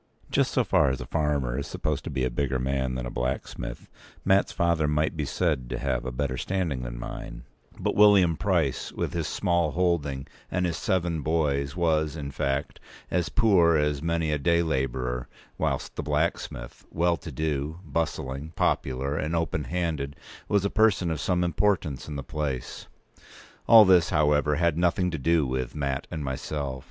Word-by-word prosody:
Just -, -, +2 dB
so -, -, +2 dB
far -, -, +3 dB
as 65 Hz, -, -2 dB
a 60 Hz, -, -5 dB
farmer 70 Hz, -3 st, 0 dB
is 70 Hz, -, -4 dB
supposed 75 Hz, 0 st, -2 dB
to -, -, -3 dB
be 65 Hz, -, -2 dB
a 65 Hz, -, 0 dB
bigger 65 Hz, +1 st, 0 dB
man 65 Hz, 0 st, -1 dB
than 65 Hz, -1 st, -3 dB
a -, -, -5 dB
blacksmith, 60 Hz, -1 st, -4 dB, 0.4 s
Mat's 95 Hz, 0 st, +3 dB
father 85 Hz, -3 st, +1 dB
might 75 Hz, +2 st, +1 dB
be 75 Hz, -2 st, -2 dB
said 75 Hz, -5 st, -1 dB
to -, -, -3 dB
have 65 Hz, -3 st, -1 dB
a 65 Hz, -, -3 dB
better 65 Hz, +1 st, -2 dB
standing 85 Hz, -8 st, -1 dB
than -, -, -6 dB
mine; -, -, -7 dB, 0.4 s
but -, -, 0 dB
William 100 Hz, -5 st, +6 dB
Price, 85 Hz, -8 st, 0 dB
with -, -, -3 dB
his 85 Hz, -3 st, -1 dB
small 85 Hz, -4 st, +1 dB
holding 75 Hz, -6 st, 0 dB, 0.2 s
and 90 Hz, 0 st, 0 dB
his 85 Hz, -2 st, -1 dB
seven 85 Hz, 0 st, 0 dB
boys, 70 Hz, -2 st, 0 dB
was, 80 Hz, -3 st, +1 dB
in 70 Hz, -3 st, -5 dB
fact, 70 Hz, +1 st, -2 dB, 0.3 s
as 90 Hz, -1 st, 0 dB
poor 95 Hz, -8 st, +4 dB
as 75 Hz, -1 st, 0 dB
many 85 Hz, -1 st, 0 dB
a 75 Hz, -, 0 dB
day 85 Hz, +3 st, +3 dB
labourer; 65 Hz, -4 st, -2 dB, 0.3 s
whilst -, -, -1 dB
the -, -, -2 dB
blacksmith, -, -, -2 dB
well 85 Hz, +1 st, +2 dB
to -, -, -8 dB
do, 75 Hz, +1 st, -2 dB
bustling, 75 Hz, -1 st, -3 dB
popular, 70 Hz, +2 st, 0 dB
and 80 Hz, +1 st, -1 dB
open 80 Hz, -3 st, -1 dB
handed, 80 Hz, -5 st, -2 dB, 0.3 s
was 100 Hz, -1 st, +2 dB
a 100 Hz, -, 0 dB
person 100 Hz, -6 st, +3 dB
of 80 Hz, -3 st, -2 dB
some 90 Hz, +2 st, +1 dB
importance 85 Hz, -5 st, 0 dB
in 75 Hz, -, -5 dB
the 70 Hz, -, -4 dB
place. 70 Hz, -5 st, -4 dB, 0.8 s
All 110 Hz, -2 st, +9 dB
p. 95 Hz, -, +4 dB
189this, 85 Hz, -2 st, +5 dB
however, 75 Hz, -2 st, +2 dB
had 85 Hz, +1 st, +1 dB
nothing 90 Hz, +1 st, +2 dB
to 80 Hz, -, -3 dB
do 80 Hz, +1 st, +2 dB
with 65 Hz, 0 st, -3 dB
Mat 70 Hz, -1 st, -2 dB
and 80 Hz, -4 st, -4 dB
myself. 65 Hz, 0 st, -3 dB
75 Hz, 180 wpm, -27 LUFS, 65-85 Hz, 0.8 s, All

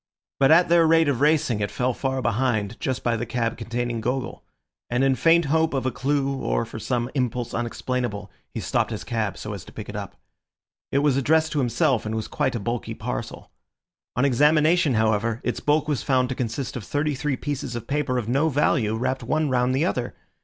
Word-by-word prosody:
But 135 Hz, -, +5 dB
at 170 Hz, +3 st, +6 dB
their 170 Hz, -1 st, +5 dB
rate 165 Hz, 0 st, +4 dB
of 140 Hz, -3 st, 0 dB
racing 150 Hz, -7 st, +3 dB
it 105 Hz, 0 st, -1 dB
fell 125 Hz, 0 st, -1 dB
far 130 Hz, +1 st, -2 dB
behind, 115 Hz, -2 st, 0 dB
just 130 Hz, -1 st, -2 dB
by 120 Hz, -1 st, +1 dB
the 115 Hz, +1 st, -3 dB
cab 115 Hz, -1 st, -1 dB
containing 120 Hz, 0 st, -3 dB
Gogol; 125 Hz, +2 st, -3 dB, 0.5 s
and 120 Hz, +2 st, +1 dB
in 135 Hz, 0 st, +4 dB
faint 165 Hz, +4 st, +4 dB
hope 160 Hz, +1 st, +1 dB
of 130 Hz, -, -1 dB
a 130 Hz, -, +1 dB
clue 135 Hz, 0 st, 0 dB
or -, -, -1 dB
for -, -, -8 dB
some 120 Hz, 0 st, -2 dB
impulse 125 Hz, -3 st, -2 dB
unexplainable, 120 Hz, -3 st, -3 dB, 0.2 s
he -, -, -5 dB
stopped -, -, 0 dB
his -, -, -5 dB
cab 110 Hz, -4 st, -2 dB
so 105 Hz, -, -6 dB
as 100 Hz, -, -7 dB
to -, -, -13 dB
pick -, -, -8 dB
it -, -, -7 dB
up. -, -, -6 dB, 0.8 s
It 140 Hz, +1 st, +2 dB
was 140 Hz, -3 st, +3 dB
addressed 155 Hz, +4 st, +2 dB
to 150 Hz, -, 0 dB
himself, 125 Hz, 0 st, +1 dB
and 110 Hz, 0 st, -3 dB
was 110 Hz, -, -3 dB
quite 135 Hz, -4 st, -1 dB
a -, -, -1 dB
bulky 115 Hz, +4 st, -3 dB
parcel. -, -, -6 dB, 0.6 s
On 125 Hz, -, +2 dB
examination, 150 Hz, +2 st, +4 dB
however, 110 Hz, +1 st, +1 dB
its -, -, -2 dB
bulk 150 Hz, +1 st, +1 dB
was 150 Hz, -4 st, 0 dB
found 130 Hz, -2 st, +1 dB
to -, -, -1 dB
consist 125 Hz, +1 st, -3 dB
of 120 Hz, -, -5 dB
thirty 145 Hz, +6 st, -1 dB
three 140 Hz, 0 st, -2 dB
pieces 140 Hz, -3 st, -4 dB
of 120 Hz, -1 st, -5 dB
paper 140 Hz, -1 st, -1 dB
of 120 Hz, -3 st, -2 dB
no 140 Hz, +7 st, +2 dB
value 130 Hz, -6 st, +1 dB
wrapped 130 Hz, +3 st, -1 dB
one 155 Hz, +4 st, 0 dB
round 125 Hz, 0 st, +2 dB
the 145 Hz, +5 st, +2 dB
other. 125 Hz, -9 st, -2 dB
130 Hz, 210 wpm, -24 LUFS, 115-145 Hz, 0.8 s, at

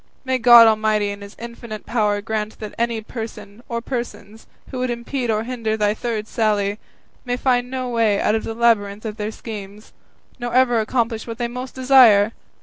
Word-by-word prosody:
may 260 Hz, 0 st, 0 dB
God 240 Hz, -1 st, +9 dB
Almighty 215 Hz, -2 st, +2 dB
in 200 Hz, 0 st, -8 dB
his 200 Hz, +1 st, -11 dB
infinite 235 Hz, -2 st, -8 dB
power 210 Hz, -3 st, 0 dB
grant 215 Hz, 0 st, -4 dB
that 215 Hz, -1 st, -8 dB
any 235 Hz, -1 st, -1 dB
person 220 Hz, -1 st, -8 dB
or 235 Hz, -1 st, -2 dB
persons, 230 Hz, -4 st, -6 dB, 0.2 s
who 260 Hz, -, -4 dB
would 255 Hz, 0 st, -1 dB
impede 240 Hz, +1 st, -3 dB
or 215 Hz, 0 st, +1 dB
hinder 230 Hz, -3 st, -2 dB
thy 210 Hz, -1 st, +2 dB
third 220 Hz, -1 st, -4 dB
sally, 210 Hz, -2 st, 0 dB, 0.4 s
may 245 Hz, -1 st, -2 dB
find 250 Hz, -1 st, +1 dB
no 255 Hz, -1 st, -3 dB
way 230 Hz, -4 st, +1 dB
out 210 Hz, -, +1 dB
of 220 Hz, -, 0 dB
the 225 Hz, -, -5 dB
labyrinth 215 Hz, -3 st, +1 dB
of 215 Hz, -1 st, -5 dB
their 210 Hz, -1 st, -3 dB
schemes, 210 Hz, -2 st, -9 dB, 0.5 s
nor 240 Hz, 0 st, -4 dB
ever 250 Hz, -2 st, +4 dB
accomplish 225 Hz, 0 st, -1 dB
what 230 Hz, -1 st, -6 dB
they 240 Hz, -, -1 dB
most 250 Hz, +2 st, -7 dB
desire!" 250 Hz, -6 st, +6 dB
225 Hz, 185 wpm, -21 LUFS, 210-240 Hz, 0.5 s, God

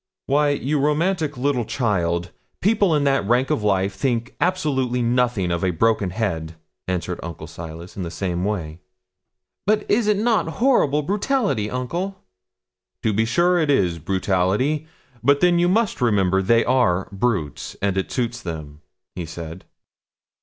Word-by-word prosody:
'Why, 145 Hz, +2 st, +3 dB
you 145 Hz, +1 st, 0 dB
romantic 150 Hz, +1 st, 0 dB
little 130 Hz, -1 st, +1 dB
child, 90 Hz, -8 st, -1 dB, 0.3 s
people 200 Hz, -4 st, +3 dB
in 145 Hz, -, +2 dB
that 135 Hz, -3 st, +2 dB
rank 125 Hz, +3 st, +2 dB
of -, -, +1 dB
life 100 Hz, -1 st, +1 dB
think 120 Hz, 0 st, -2 dB
absolutely 135 Hz, -9 st, +1 dB
nothing 120 Hz, -6 st, +1 dB
of 85 Hz, 0 st, -1 dB
a 95 Hz, -, +2 dB
broken 100 Hz, +3 st, +1 dB
head,' 85 Hz, -6 st, -3 dB, 0.3 s
answered 90 Hz, -1 st, -2 dB
Uncle 80 Hz, -2 st, -7 dB
Silas, 85 Hz, +2 st, -9 dB
in 100 Hz, -, -5 dB
the 85 Hz, -, -3 dB
same 90 Hz, 0 st, -2 dB
way. 85 Hz, -6 st, -3 dB, 0.9 s
'But 210 Hz, 0 st, +2 dB
is 215 Hz, +1 st, +3 dB
it 210 Hz, -1 st, +3 dB
not 220 Hz, -3 st, +2 dB
horrible 150 Hz, -, +3 dB
brutality, 200 Hz, -, 0 dB
uncle?' 170 Hz, -, -3 dB, 0.8 s
'To 110 Hz, -, +1 dB
be 110 Hz, +2 st, +2 dB
sure 175 Hz, +8 st, +3 dB
it 155 Hz, -3 st, +1 dB
is 90 Hz, -11 st, +2 dB
brutality; 95 Hz, -, 0 dB, 0.3 s
but 140 Hz, +3 st, +4 dB
then 175 Hz, +1 st, +4 dB
you 175 Hz, +1 st, +3 dB
must 215 Hz, -, +1 dB
remember 95 Hz, -5 st, +3 dB
they 115 Hz, +4 st, +3 dB
are 115 Hz, -8 st, +2 dB
brutes, 100 Hz, -, -2 dB
and 100 Hz, -1 st, 0 dB
it 95 Hz, -, -2 dB
suits 120 Hz, -1 st, -2 dB
them,' 75 Hz, -3 st, -7 dB, 0.4 s
said 80 Hz, +1 st, -8 dB
he. -, -, -40 dB
120 Hz, 155 wpm, -22 LUFS, 90-150 Hz, 0.9 s, but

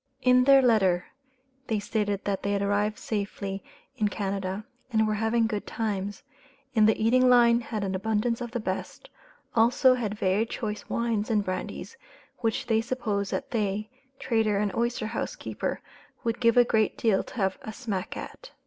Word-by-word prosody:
In 250 Hz, 0 st, +5 dB
their 275 Hz, -1 st, +7 dB
letter 190 Hz, -7 st, +3 dB, 0.6 s
they 220 Hz, -, 0 dB
stated 205 Hz, -1 st, -2 dB
that 200 Hz, -1 st, -1 dB
they 200 Hz, -, -1 dB
had 200 Hz, 0 st, 0 dB
arrived 205 Hz, +1 st, +1 dB
safely 200 Hz, -2 st, -4 dB, 0.3 s
in 210 Hz, -, +2 dB
Canada, 195 Hz, 0 st, -3 dB, 0.3 s
and 220 Hz, -1 st, +3 dB
were 215 Hz, -, +1 dB
having 225 Hz, +2 st, +1 dB
good 215 Hz, -2 st, -3 dB
times, 205 Hz, +2 st, -3 dB, 0.5 s
in 215 Hz, -2 st, +5 dB
the 220 Hz, -, +2 dB
eating 250 Hz, +3 st, +4 dB
line 235 Hz, -1 st, +6 dB
had 220 Hz, -3 st, -4 dB
an 195 Hz, -1 st, -2 dB
abundance 220 Hz, +4 st, 0 dB
of 240 Hz, -, -4 dB
the 240 Hz, +1 st, -3 dB
best, -, -, -5 dB, 0.4 s
also 240 Hz, +3 st, +5 dB
had 215 Hz, -4 st, -2 dB
very 200 Hz, +3 st, +1 dB
choice 210 Hz, -2 st, -5 dB
wines 230 Hz, -2 st, -1 dB
and 210 Hz, -3 st, +1 dB
brandies, 185 Hz, -, -5 dB, 0.4 s
which 225 Hz, -2 st, -1 dB
they 225 Hz, -1 st, +2 dB
supposed 220 Hz, -5 st, -2 dB
that 275 Hz, -, -3 dB
they 215 Hz, -2 st, -1 dB, 0.3 s
(trader 220 Hz, -5 st, +1 dB
and 205 Hz, -1 st, 0 dB
oyster 235 Hz, 0 st, -1 dB
house 230 Hz, -, -3 dB
keeper) -, -, -4 dB, 0.4 s
would 230 Hz, 0 st, -1 dB
give 230 Hz, -1 st, +3 dB
a 245 Hz, -, +7 dB
great 220 Hz, -3 st, +1 dB
deal 215 Hz, -4 st, +2 dB
to -, -, -13 dB
have 190 Hz, -4 st, 0 dB
a 220 Hz, -, -6 dB
"smack 215 Hz, -6 st, -4 dB
at." -, -, -9 dB
220 Hz, 175 wpm, -27 LUFS, 205-235 Hz, 0.6 s, their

